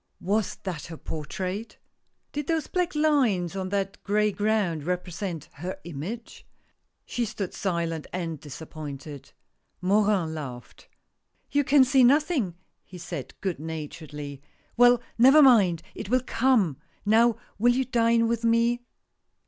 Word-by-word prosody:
Was 205 Hz, +1 st, 0 dB
that 180 Hz, -5 st, -5 dB
her 165 Hz, -1 st, -8 dB
portrait! 185 Hz, +9 st, -5 dB, 0.5 s
Did 295 Hz, -1 st, -4 dB
those 320 Hz, -3 st, 0 dB
black 360 Hz, -2 st, -1 dB
lines 255 Hz, -, +2 dB
on 190 Hz, -1 st, -3 dB
that 195 Hz, 0 st, -2 dB
gray 210 Hz, +1 st, +2 dB
ground 205 Hz, -7 st, 0 dB
represent 180 Hz, -1 st, -4 dB
her 180 Hz, +6 st, -6 dB
image? 175 Hz, +9 st, -7 dB, 0.6 s
She 245 Hz, -, -2 dB
stood 205 Hz, -4 st, -4 dB
silent 170 Hz, -4 st, -2 dB
and 165 Hz, -4 st, -4 dB
disappointed. 145 Hz, -1 st, -8 dB, 0.5 s
Morin 195 Hz, -3 st, +2 dB
laughed. 130 Hz, -6 st, -8 dB, 0.6 s
*'You 285 Hz, 0 st, +3 dB
can 280 Hz, 0 st, +6 dB
see 260 Hz, 0 st, +4 dB
nothing!" 270 Hz, -, +3 dB, 0.3 s
he 180 Hz, -, -12 dB
said, 175 Hz, 0 st, -7 dB
good 185 Hz, -7 st, -2 dB
naturedly. 150 Hz, -2 st, -7 dB, 0.3 s
"Well, 245 Hz, 0 st, +5 dB, 0.2 s
never 270 Hz, +5 st, +8 dB
mind, 195 Hz, -, +5 dB
it -, -, -7 dB
will 255 Hz, +1 st, +2 dB
come! 225 Hz, -, +2 dB, 0.3 s
Now, 225 Hz, +2 st, +4 dB, 0.2 s
will 240 Hz, +3 st, +5 dB
you 260 Hz, 0 st, +1 dB
dine 230 Hz, -2 st, +3 dB
with 235 Hz, 0 st, -1 dB
me?" 230 Hz, +1 st, +2 dB
200 Hz, 130 wpm, -26 LUFS, 165-240 Hz, 0.6 s, never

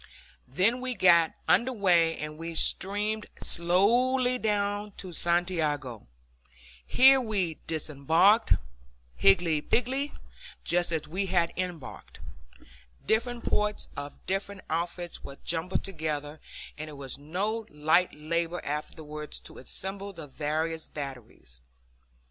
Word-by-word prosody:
Then 185 Hz, -, +3 dB
the -, -, -8 dB
fleet 255 Hz, -2 st, -3 dB
got 170 Hz, -3 st, +6 dB
under 255 Hz, +2 st, +4 dB
way, 175 Hz, -7 st, +3 dB
and 150 Hz, 0 st, -5 dB
we 165 Hz, +1 st, -6 dB
steamed 210 Hz, +5 st, +2 dB
slowly 245 Hz, +9 st, +2 dB
down 205 Hz, -1 st, -1 dB
to 185 Hz, -, -7 dB
Santiago. 155 Hz, -, -1 dB, 0.8 s
Here 265 Hz, -, +6 dB
we 195 Hz, -9 st, -2 dB
disembarked, 160 Hz, -, +3 dB, 0.6 s
higgledy 150 Hz, -, +4 dB
piggledy, 265 Hz, -, 0 dB, 0.5 s
just 175 Hz, 0 st, +1 dB
as 155 Hz, -2 st, -1 dB
we 190 Hz, +5 st, -2 dB
had 175 Hz, -2 st, +1 dB
embarked. 180 Hz, -6 st, -6 dB, 0.9 s
Different 235 Hz, +2 st, 0 dB
parts 210 Hz, 0 st, 0 dB
of 145 Hz, 0 st, -6 dB
different 195 Hz, 0 st, -3 dB
outfits 170 Hz, +1 st, -3 dB
were 140 Hz, -, -9 dB
jumbled 170 Hz, +2 st, -1 dB
together, 155 Hz, -4 st, -4 dB, 0.4 s
and 155 Hz, 0 st, -5 dB
it -, -, -9 dB
was 140 Hz, -1 st, -6 dB
no 205 Hz, +9 st, -2 dB
light 155 Hz, +4 st, +2 dB
labor 170 Hz, +3 st, -2 dB
afterwards 150 Hz, +1 st, -5 dB
to -, -, -11 dB
assemble 195 Hz, +8 st, -5 dB
the 165 Hz, -4 st, -8 dB
various 155 Hz, +3 st, -2 dB
batteries. 125 Hz, -, -8 dB
170 Hz, 115 wpm, -28 LUFS, 150-205 Hz, 0.9 s, got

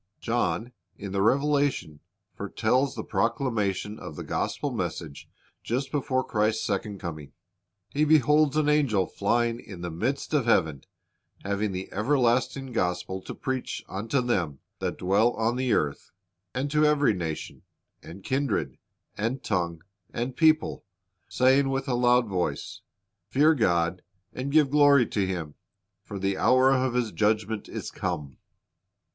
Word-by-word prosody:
John 120 Hz, 0 st, -1 dB, 0.2 s
in 100 Hz, -1 st, -7 dB
the 100 Hz, 0 st, 0 dB
Revelation 140 Hz, -, +1 dB, 0.3 s
foretells 130 Hz, +5 st, 0 dB
the -, -, -4 dB
proclamation 105 Hz, -2 st, -1 dB
of -, -, -8 dB
the -, -, -6 dB
gospel -, -, -2 dB
message 70 Hz, -, -5 dB, 0.3 s
just 135 Hz, +3 st, -2 dB
before 130 Hz, -2 st, 0 dB
Christ's 110 Hz, 0 st, 0 dB
second 100 Hz, -1 st, -2 dB
coming. 75 Hz, -5 st, -7 dB, 0.6 s
He 145 Hz, +9 st, 0 dB
beholds 150 Hz, 0 st, +4 dB
an 155 Hz, -1 st, +2 dB
angel 140 Hz, -11 st, +3 dB
flying 115 Hz, +5 st, 0 dB
"in 95 Hz, -4 st, -10 dB
the 85 Hz, -1 st, -4 dB
midst 125 Hz, -, -2 dB
of 145 Hz, -6 st, +2 dB
heaven, 80 Hz, -, +2 dB, 0.6 s
having 100 Hz, +1 st, -1 dB
the 95 Hz, 0 st, -4 dB
everlasting 130 Hz, +2 st, +1 dB
gospel 90 Hz, -3 st, -2 dB
to -, -, -8 dB
preach 130 Hz, -1 st, -4 dB
unto 115 Hz, +7 st, -1 dB
them 90 Hz, -, -1 dB, 0.2 s
that -, -, -3 dB
dwell 100 Hz, +6 st, +2 dB
on 115 Hz, +2 st, 0 dB
the 130 Hz, -1 st, 0 dB
earth, 70 Hz, -1 st, 0 dB, 0.4 s
and 135 Hz, +3 st, -3 dB
to 150 Hz, +1 st, +3 dB
every 150 Hz, -5 st, +4 dB
nation, 80 Hz, -4 st, -5 dB, 0.4 s
and 95 Hz, +4 st, -11 dB
kindred, 135 Hz, +1 st, -1 dB, 0.4 s
and 115 Hz, +5 st, -2 dB
tongue, 85 Hz, -5 st, -2 dB, 0.3 s
and 120 Hz, +2 st, -3 dB
people, 155 Hz, 0 st, +3 dB, 0.5 s
saying 135 Hz, +2 st, +3 dB
with 135 Hz, +1 st, -2 dB
a 130 Hz, -, 0 dB
loud 120 Hz, 0 st, +4 dB
voice. 90 Hz, -3 st, -3 dB, 0.5 s
Fear 150 Hz, +4 st, +4 dB
God, 90 Hz, -, +1 dB, 0.3 s
and 130 Hz, +2 st, -4 dB
give 150 Hz, -2 st, +4 dB
glory 145 Hz, -3 st, +6 dB
to 100 Hz, -3 st, 0 dB
Him; 85 Hz, -5 st, -4 dB, 0.5 s
for 100 Hz, -, -7 dB
the 95 Hz, 0 st, -1 dB
hour 130 Hz, +1 st, +5 dB
of 130 Hz, -2 st, +1 dB
His 120 Hz, -3 st, 0 dB
judgment 110 Hz, 0 st, 0 dB
is -, -, -6 dB
come." 75 Hz, -8 st, -4 dB
115 Hz, 140 wpm, -27 LUFS, 95-135 Hz, 0.6 s, glory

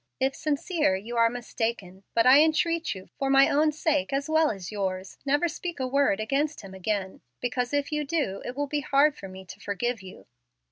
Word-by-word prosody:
If 265 Hz, +1 st, +1 dB
sincere, 300 Hz, -, 0 dB
you 220 Hz, +5 st, -6 dB
are 230 Hz, 0 st, +5 dB
mistaken. 225 Hz, -5 st, -4 dB
But 230 Hz, -, +4 dB
I 265 Hz, +3 st, +8 dB
entreat 330 Hz, -, +1 dB
you, 190 Hz, 0 st, -11 dB
for 275 Hz, -, 0 dB
my 270 Hz, 0 st, +6 dB
own 305 Hz, +2 st, +3 dB
sake 295 Hz, -2 st, 0 dB
as 275 Hz, +1 st, -1 dB
well 315 Hz, 0 st, +3 dB
as 190 Hz, -3 st, -5 dB
yours, 190 Hz, -2 st, -4 dB
never 290 Hz, +5 st, +3 dB
speak 340 Hz, 0 st, -5 dB
a 260 Hz, -, 0 dB
word 270 Hz, -5 st, +2 dB
against 275 Hz, +8 st, -1 dB
him 195 Hz, -2 st, -11 dB
again. 190 Hz, 0 st, -3 dB, 0.2 s
Because, 245 Hz, 0 st, -2 dB
if 285 Hz, 0 st, -1 dB
you 300 Hz, 0 st, 0 dB
do, 275 Hz, -10 st, -2 dB
it 250 Hz, -, -6 dB
will 290 Hz, -, 0 dB
be 295 Hz, +1 st, -2 dB
hard 280 Hz, +1 st, +3 dB
for 195 Hz, -, -9 dB
me 190 Hz, 0 st, -11 dB
to 175 Hz, -, -11 dB
forgive 230 Hz, +3 st, -2 dB
you. 185 Hz, -1 st, -12 dB
265 Hz, 205 wpm, -27 LUFS, 200-295 Hz, 0.2 s, I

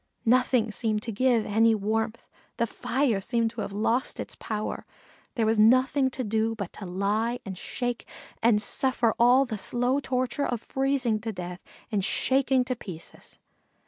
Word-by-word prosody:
Nothing 245 Hz, -1 st, +3 dB
seemed 215 Hz, 0 st, -1 dB
to 230 Hz, -, -3 dB
give 235 Hz, 0 st, +2 dB
any 225 Hz, +2 st, +3 dB
warmth 220 Hz, +2 st, -1 dB, 0.4 s
fire 235 Hz, -1 st, 0 dB
seemed 230 Hz, +1 st, 0 dB
to 230 Hz, -1 st, -5 dB
have -, -, -4 dB
lost 225 Hz, +5 st, 0 dB
its -, -, -6 dB
power. 215 Hz, -1 st, -4 dB, 0.5 s
There 230 Hz, -4 st, +1 dB
was 220 Hz, 0 st, +2 dB
nothing 255 Hz, +4 st, +4 dB
to 260 Hz, 0 st, -4 dB
do 220 Hz, +1 st, 0 dB
but 200 Hz, -4 st, -6 dB
to 200 Hz, -, -8 dB
lie 210 Hz, +6 st, 0 dB
and 190 Hz, -2 st, -5 dB
shake 245 Hz, +5 st, -4 dB, 0.3 s
and 225 Hz, -2 st, +4 dB
suffer 240 Hz, +1 st, 0 dB
all 250 Hz, +3 st, +6 dB
the 220 Hz, -5 st, -5 dB
slow 245 Hz, +6 st, 0 dB
torture 255 Hz, +1 st, -1 dB
of 240 Hz, -, -2 dB
freezing 265 Hz, -3 st, 0 dB
to 225 Hz, +1 st, -4 dB
death 180 Hz, -2 st, -6 dB, 0.3 s
and 205 Hz, -3 st, 0 dB
shaking 265 Hz, +3 st, +2 dB
to 255 Hz, 0 st, -2 dB
pieces. 180 Hz, -8 st, -9 dB
230 Hz, 160 wpm, -27 LUFS, 215-255 Hz, 0.5 s, all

